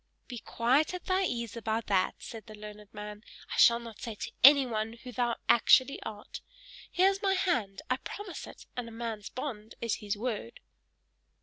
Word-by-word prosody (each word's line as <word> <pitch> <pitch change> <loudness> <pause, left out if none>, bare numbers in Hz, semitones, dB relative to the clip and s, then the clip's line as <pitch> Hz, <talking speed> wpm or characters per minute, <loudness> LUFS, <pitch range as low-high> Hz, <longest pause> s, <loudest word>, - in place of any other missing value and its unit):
"Be 245 -2 -6
quite 260 +9 +1
at 360 - -8
thy 380 0 +2
ease 235 - -3
about 225 0 -2
that," 190 -2 +2
said 225 -4 -9
the 215 - -10
learned 210 -1 -11
man; 210 0 -8 0.3
"I - - -3
shall 235 - +7
not 230 -2 -10
say 230 -2 -5
to - - -6
anyone 245 -6 +6
who 250 +2 -10
thou 240 0 0
actually 260 +3 +5
art: 210 -2 -8 0.5
here 380 +2 +5
is 390 0 -5
my 390 -1 +2
hand 250 - 0
I 255 - +1
promise 390 +6 -7
it, - - -12
and 245 -2 -4
a - - -9
man's 225 -2 -5
bond 225 -5 -6
is 230 -2 -1
his 205 -1 -2
word." 215 - -4
230 Hz, 185 wpm, -30 LUFS, 215-260 Hz, 0.5 s, shall